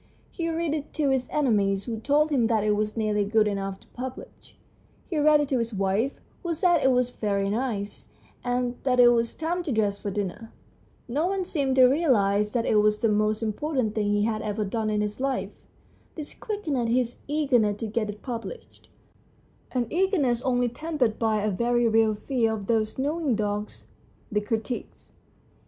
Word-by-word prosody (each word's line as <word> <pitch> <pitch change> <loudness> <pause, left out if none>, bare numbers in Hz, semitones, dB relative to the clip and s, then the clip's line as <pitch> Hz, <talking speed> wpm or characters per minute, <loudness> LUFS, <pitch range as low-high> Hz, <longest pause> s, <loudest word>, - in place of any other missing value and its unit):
He 335 -2 -3
read 330 -1 -1
it 305 -1 -4
to 295 -3 +1
his 260 -2 0
enemies, 200 -9 +1
who 225 -2 -4
told 295 +6 +2
him 245 -6 +3
that 220 -3 +1
it 210 - +2
was 215 +1 -2
nearly 210 -2 +1
good 215 +1 +2
enough 195 -1 -3
to - - -21
publish; 255 +1 -9 0.5
he 325 -5 -1
read 300 0 +5
it 290 - -2
to 260 - +1
his 230 -2 -2
wife, 195 +7 0 0.2
who 340 -2 -2
said 350 +1 +3
that - - -2
it 265 - +5
was 250 -1 +2
very 200 -3 -1
nice, 215 -3 -3 0.4
and 245 0 -1
that 250 -2 +1
it 245 -1 +8
was 235 -1 +1
time 340 +3 -2
to 330 -5 -4
dress 205 -3 0
for 205 - -4
dinner. 205 +3 -4 0.6
No 290 +8 0
one 385 -1 -1
seemed 275 -7 0
to 260 -1 +7
realise 210 -8 +3
that 235 -2 0
it 215 - +3
was 210 0 +3
the 225 - +1
most 215 +1 +1
impor 280 +8 -2
tant 225 -5 +1
thing 215 -2 0
he 205 0 +2
had 215 0 -1
ever 210 0 -2
done 215 +2 -2
in 210 -1 0
his 210 +2 -3
life. 270 0 -1 0.6
This 300 -2 -7
quickened 305 - -2
his 245 0 0
eagerness 255 -9 +2
to - - -1
get 215 0 -2
it 210 0 -8
published 245 - -7 0.8
an 250 -2 0
eagerness 325 - +1
only 245 -1 +1
tempered 250 -3 -1
by 220 -2 +1
a 215 - +1
very 240 +4 +2
real 220 -1 +3
fear 225 0 0
of 210 -3 -5
those 220 0 0
knowing 290 -1 0
dogs, 210 0 -3 0.5
the 210 0 +1
critics. 225 +3 -5
235 Hz, 190 wpm, -26 LUFS, 210-275 Hz, 0.8 s, it